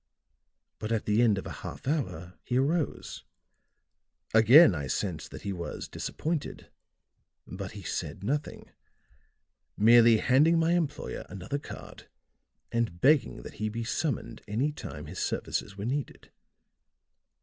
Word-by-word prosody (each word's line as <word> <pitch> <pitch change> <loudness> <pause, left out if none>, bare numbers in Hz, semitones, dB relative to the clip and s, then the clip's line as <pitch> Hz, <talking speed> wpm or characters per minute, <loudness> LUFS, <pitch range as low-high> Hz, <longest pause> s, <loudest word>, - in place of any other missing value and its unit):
But 110 +1 -4
at 115 -2 0
the 105 +2 +3
end 110 -4 +4
of 95 - -5
a - - -6
half - - -8
hour 95 - -3
he 125 - -1
arose; 150 +4 -1 1.1
again 115 - +8
I 70 -4 -3
sensed 85 +3 -3
that - - -10
he 100 -1 -2
was 85 -2 -6
disappointed; 160 -2 -4 0.7
but 95 +2 -7
he 100 -2 -9
said 80 +2 -4
nothing, 145 +7 -3 1.1
merely 115 +1 +7
handing 150 +9 +4
my 165 0 +2
employer 175 -4 -1
another 100 +9 -4
card - - -11 0.6
and 115 -7 -1
begging 145 - +3
that - - -9
he 110 - 0
be 115 +2 -4
summoned 130 +4 -2
any 120 +9 0
time 75 - -8
his 85 +5 -7
services 100 - -2
were 100 - -4
needed. 135 +3 -4
115 Hz, 135 wpm, -29 LUFS, 100-145 Hz, 1.1 s, again